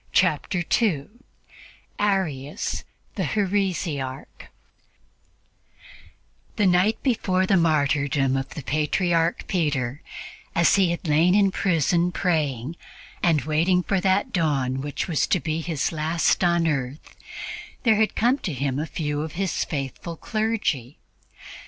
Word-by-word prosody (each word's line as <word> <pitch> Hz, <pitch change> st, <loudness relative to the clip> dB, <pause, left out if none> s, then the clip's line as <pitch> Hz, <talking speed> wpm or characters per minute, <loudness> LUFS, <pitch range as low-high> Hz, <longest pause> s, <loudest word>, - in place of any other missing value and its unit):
Chapter 180 Hz, -3 st, +2 dB
2 205 Hz, -, 0 dB, 0.8 s
ARIUS 165 Hz, -9 st, -1 dB, 0.3 s
THE -, -, -2 dB
HERESIARCH 180 Hz, -10 st, -2 dB, 2.1 s
THE 210 Hz, -, +2 dB
night 185 Hz, +4 st, +3 dB
before 190 Hz, -8 st, +1 dB
the 195 Hz, -, +3 dB
martyrdom 145 Hz, -5 st, +2 dB
of 135 Hz, 0 st, -2 dB
the 150 Hz, -, -6 dB
Patriarch 165 Hz, +4 st, +1 dB
Peter, 145 Hz, -6 st, -1 dB, 0.5 s
as 170 Hz, 0 st, +4 dB
he 190 Hz, -3 st, +4 dB
had 170 Hz, +1 st, -3 dB
lain 165 Hz, +5 st, +4 dB
in 200 Hz, -2 st, +4 dB
prison 175 Hz, -1 st, +1 dB
praying 155 Hz, -5 st, -1 dB, 0.4 s
and 160 Hz, -4 st, +2 dB
waiting 170 Hz, +4 st, +2 dB
for 195 Hz, 0 st, 0 dB
that 195 Hz, +6 st, +1 dB
dawn 135 Hz, -6 st, 0 dB
which 145 Hz, 0 st, -3 dB
was 165 Hz, -5 st, +1 dB
to 185 Hz, -, +2 dB
be 160 Hz, 0 st, -2 dB
his 160 Hz, -4 st, -1 dB
last 160 Hz, +3 st, +1 dB
on 170 Hz, -1 st, +3 dB
earth, 140 Hz, -2 st, -3 dB, 0.7 s
there 225 Hz, -4 st, +4 dB
had 220 Hz, 0 st, +1 dB
come 245 Hz, +5 st, +2 dB
to 175 Hz, -, -3 dB
him 135 Hz, 0 st, -1 dB
a 155 Hz, -, -2 dB
few 150 Hz, -2 st, -2 dB
of 155 Hz, 0 st, -5 dB
his 190 Hz, 0 st, -1 dB
faithful 145 Hz, +4 st, -5 dB
clergy. 215 Hz, -, -2 dB
165 Hz, 125 wpm, -24 LUFS, 145-190 Hz, 2.1 s, as